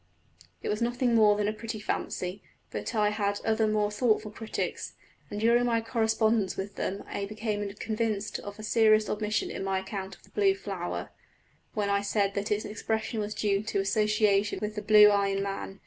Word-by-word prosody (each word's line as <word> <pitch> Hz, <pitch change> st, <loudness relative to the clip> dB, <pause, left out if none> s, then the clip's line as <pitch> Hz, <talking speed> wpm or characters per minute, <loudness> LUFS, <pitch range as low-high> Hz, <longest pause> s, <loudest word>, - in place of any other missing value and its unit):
It -, -, -2 dB
was 210 Hz, +2 st, -1 dB
nothing 240 Hz, +1 st, +1 dB
more 210 Hz, -2 st, +5 dB
than 210 Hz, 0 st, 0 dB
a 215 Hz, -, 0 dB
pretty 220 Hz, 0 st, -6 dB
fancy; 185 Hz, -2 st, -3 dB, 0.3 s
but -, -, -4 dB
I 210 Hz, -1 st, +3 dB
had 205 Hz, -1 st, -1 dB
other 220 Hz, 0 st, +2 dB
more 210 Hz, -1 st, +1 dB
thoughtful 215 Hz, -1 st, +1 dB
critics, 220 Hz, +1 st, -4 dB, 0.3 s
and 205 Hz, -, -4 dB
during 235 Hz, +2 st, +4 dB
my 230 Hz, -1 st, +2 dB
correspondence 225 Hz, -2 st, +1 dB
with 195 Hz, +1 st, -4 dB
them 195 Hz, +2 st, -3 dB
I 200 Hz, -, -4 dB
became 210 Hz, -1 st, -3 dB
convinced 215 Hz, -1 st, -2 dB
of 205 Hz, 0 st, -8 dB
a 215 Hz, -, -9 dB
serious 215 Hz, -1 st, +4 dB
omission 210 Hz, 0 st, -1 dB
in -, -, -4 dB
my 195 Hz, 0 st, 0 dB
account 190 Hz, 0 st, -5 dB
of -, -, -25 dB
the -, -, -21 dB
blue 195 Hz, -2 st, +3 dB
flower, 195 Hz, -3 st, -5 dB, 0.6 s
when 205 Hz, -2 st, 0 dB
I 200 Hz, 0 st, +2 dB
said 200 Hz, -1 st, 0 dB
that 200 Hz, +2 st, -3 dB
its 210 Hz, 0 st, 0 dB
expression 220 Hz, +1 st, -2 dB
was 210 Hz, 0 st, -3 dB
due 200 Hz, -2 st, +1 dB
to 215 Hz, -2 st, -2 dB
association 210 Hz, 0 st, +2 dB
with 210 Hz, 0 st, -3 dB
the 210 Hz, -, -4 dB
blue 210 Hz, -1 st, +8 dB
eye 200 Hz, -1 st, +3 dB
in 195 Hz, 0 st, -1 dB
man. 195 Hz, 0 st, -5 dB
210 Hz, 195 wpm, -28 LUFS, 200-220 Hz, 0.6 s, blue